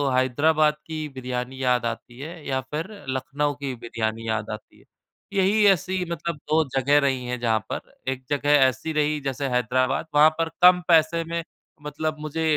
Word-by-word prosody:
हैदराबाद 150 Hz, +4 st, +3 dB
की 155 Hz, -1 st, -4 dB
बिरयानी 130 Hz, 0 st, -5 dB
याद 125 Hz, -2 st, +2 dB
आती 120 Hz, +1 st, -5 dB
है 160 Hz, +2 st, -8 dB
या 130 Hz, -1 st, 0 dB
फिर 150 Hz, +6 st, -5 dB, 0.2 s
लखनऊ 145 Hz, +3 st, -1 dB
की 140 Hz, -1 st, -4 dB
बिरयानी 115 Hz, -1 st, -4 dB
याद 110 Hz, -1 st, -2 dB
आती 105 Hz, -, -11 dB
है। -, -, -23 dB, 0.5 s
यही 200 Hz, +2 st, +3 dB
ऐसी 190 Hz, -1 st, +2 dB
मतलब 170 Hz, +1 st, -3 dB
2 160 Hz, +1 st, +3 dB
जगह 140 Hz, +3 st, +4 dB
रही 135 Hz, -3 st, 0 dB
हैं 125 Hz, 0 st, -3 dB
जहाँ 115 Hz, -2 st, +2 dB
पर -, -, -6 dB, 0.2 s
एक 130 Hz, 0 st, -6 dB
जगह 145 Hz, 0 st, 0 dB, 0.2 s
ऐसी 130 Hz, +6 st, -3 dB
रही 150 Hz, 0 st, +1 dB
जैसे 135 Hz, 0 st, -2 dB
हैदराबाद, 130 Hz, +3 st, +1 dB
वहाँ 150 Hz, +1 st, +8 dB
पर 165 Hz, 0 st, +1 dB
कम 180 Hz, 0 st, +7 dB
पैसे 165 Hz, 0 st, +4 dB
में 170 Hz, 0 st, -3 dB, 0.4 s
मतलब 155 Hz, +1 st, -3 dB
मुझे 155 Hz, +1 st, -3 dB
145 Hz, 170 wpm, -24 LUFS, 125-160 Hz, 0.5 s, वहाँ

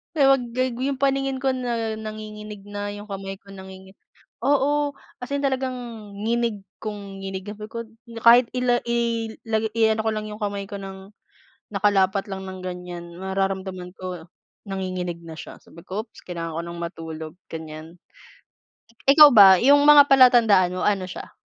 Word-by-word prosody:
Eh, 280 Hz, -3 st, +4 dB
wag 270 Hz, -2 st, +4 dB
gag 255 Hz, 0 st, -1 dB
'yung 265 Hz, +2 st, -2 dB
paningin 270 Hz, -1 st, 0 dB
ko 265 Hz, -1 st, 0 dB
na 235 Hz, -3 st, -2 dB
nanginginig 215 Hz, -1 st, -8 dB
na, 205 Hz, 0 st, -5 dB
'yung 205 Hz, +1 st, -9 dB
kamay 195 Hz, -1 st, -6 dB
ko -, -, -29 dB
nanginginig 190 Hz, 0 st, -12 dB, 0.5 s
oo, 290 Hz, +1 st, +2 dB, 0.3 s
as 250 Hz, -, -7 dB
in 280 Hz, -, 0 dB
talagang 265 Hz, -2 st, -1 dB, 0.5 s
nginig 225 Hz, -2 st, -1 dB, 0.2 s
kong 200 Hz, -2 st, -7 dB
nginig 190 Hz, 0 st, -6 dB
sabi 210 Hz, +1 st, -8 dB
ko, 230 Hz, 0 st, -5 dB, 0.4 s
kahit 235 Hz, +1 st, +7 dB
ila 250 Hz, -1 st, +1 dB
ilagay 225 Hz, -1 st, 0 dB
ko 220 Hz, 0 st, -1 dB
lang 215 Hz, 0 st, -4 dB
'yung 210 Hz, +1 st, -9 dB
kamay 200 Hz, -1 st, -3 dB
ko 205 Hz, -, -7 dB
ng 195 Hz, +1 st, -9 dB, 0.5 s
nakalapat 195 Hz, -1 st, +1 dB
lang 190 Hz, 0 st, -6 dB
ng 185 Hz, 0 st, -7 dB
ganiyan 180 Hz, -1 st, -6 dB
mararamdaman 190 Hz, -1 st, -3 dB
ko 180 Hz, -3 st, -6 dB, 0.4 s
nanginginig 185 Hz, -3 st, -4 dB
na 160 Hz, -1 st, -9 dB
siya -, -, -10 dB
sabi 170 Hz, -, -16 dB
ko, 200 Hz, +4 st, -5 dB
"Ops -, -, -17 dB
kailangan 165 Hz, -2 st, -5 dB
ko 165 Hz, -, -2 dB
ng 170 Hz, 0 st, -7 dB
matulog," 160 Hz, -2 st, -7 dB, 0.2 s
ganiyan. 160 Hz, +1 st, -8 dB, 1.1 s
Ikaw 295 Hz, +1 st, +9 dB
ba 205 Hz, -4 st, +9 dB
'yung 285 Hz, +3 st, +6 dB
mga 290 Hz, -1 st, +9 dB
palatandaan 235 Hz, -9 st, +6 dB
mo, 185 Hz, -, -3 dB
ano 200 Hz, -3 st, +1 dB
siya? 175 Hz, -, -8 dB
205 Hz, 155 wpm, -23 LUFS, 190-235 Hz, 1.1 s, Ikaw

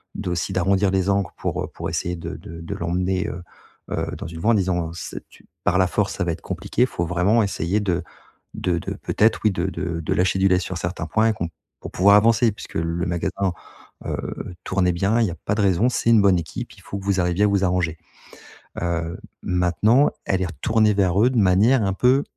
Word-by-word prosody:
d'aussi 90 Hz, +1 st, -2 dB
d'arrondir 95 Hz, +2 st, +2 dB
les 95 Hz, 0 st, +1 dB
angles 100 Hz, -3 st, +1 dB
pour, -, -, -2 dB
heu, -, -, -4 dB
pour -, -, -6 dB
essayer 90 Hz, 0 st, -2 dB
de 85 Hz, -, -6 dB
de 85 Hz, 0 st, -10 dB
de 85 Hz, -, -5 dB
l'emmener, 90 Hz, +3 st, -1 dB
heu, 90 Hz, -, -5 dB, 0.5 s
heu, -, -, -1 dB
dans -, -, -6 dB
une 80 Hz, -1 st, -8 dB
voie 115 Hz, -, +3 dB
en -, -, +5 dB
disant: 90 Hz, -4 st, 0 dB
«C'est -, -, -7 dB
tu -, -, -20 dB, 0.2 s
par 95 Hz, -, +2 dB
la 95 Hz, -, +4 dB
force 100 Hz, +2 st, 0 dB
ça 100 Hz, -, -1 dB
va 85 Hz, -, 0 dB
être 80 Hz, -, -9 dB
compliqué. 95 Hz, +6 st, 0 dB
Faut 85 Hz, -9 st, -3 dB
vraiment 95 Hz, +7 st, +2 dB
essayer 100 Hz, 0 st, -1 dB
de 90 Hz, -4 st, -1 dB, 0.5 s
de 90 Hz, -2 st, 0 dB
de -, -, -5 dB
peut-être, 110 Hz, +2 st, +1 dB
oui 110 Hz, -, +4 dB
de 95 Hz, -, -2 dB
de 85 Hz, -1 st, -3 dB
de 80 Hz, -, -1 dB
lâcher 95 Hz, +1 st, +1 dB
du 95 Hz, -, +4 dB
lest 90 Hz, 0 st, +2 dB
sur 95 Hz, -, -4 dB
certains 85 Hz, -2 st, -4 dB
points 110 Hz, +5 st, +2 dB
et -, -, +1 dB
qu'on 85 Hz, -6 st, -4 dB, 0.3 s
pour -, -, -8 dB
pouvoir 100 Hz, +2 st, +5 dB
avancer, 115 Hz, +2 st, +4 dB
puisque -, -, -11 dB
le 85 Hz, +2 st, -1 dB
magasin, 90 Hz, +2 st, -1 dB, 0.5 s
heu, 90 Hz, -, -5 dB
tournait 90 Hz, -2 st, +1 dB
bien, 100 Hz, +6 st, +1 dB
il 115 Hz, -, +3 dB
y 90 Hz, -, -3 dB
a -, -, -6 dB
pas 100 Hz, -, 0 dB
de 105 Hz, -, 0 dB
raison, 100 Hz, +4 st, +3 dB
c'est 120 Hz, -, 0 dB
une 110 Hz, -2 st, +6 dB
bonne 95 Hz, -3 st, +4 dB
équipe, 80 Hz, -, -6 dB
il -, -, -17 dB
faut 100 Hz, -, -6 dB
que -, -, -11 dB
vous 100 Hz, -1 st, +1 dB
arriviez 90 Hz, +3 st, +1 dB
à -, -, +4 dB
vous 100 Hz, -1 st, +1 dB
arranger». 90 Hz, -3 st, 0 dB, 0.9 s
Heu, 85 Hz, -1 st, -2 dB, 0.2 s
maintenant, 90 Hz, -, +3 dB, 0.2 s
elle 95 Hz, -1 st, +1 dB
est -, -, 0 dB
retournée 105 Hz, +7 st, +1 dB
vers 95 Hz, -1 st, +2 dB
eux 125 Hz, -, +5 dB
de 130 Hz, -, -3 dB
manière 105 Hz, +6 st, +4 dB
un 95 Hz, -1 st, 0 dB
peu 125 Hz, +6 st, +3 dB
95 Hz, 230 wpm, -22 LUFS, 85-105 Hz, 0.9 s, une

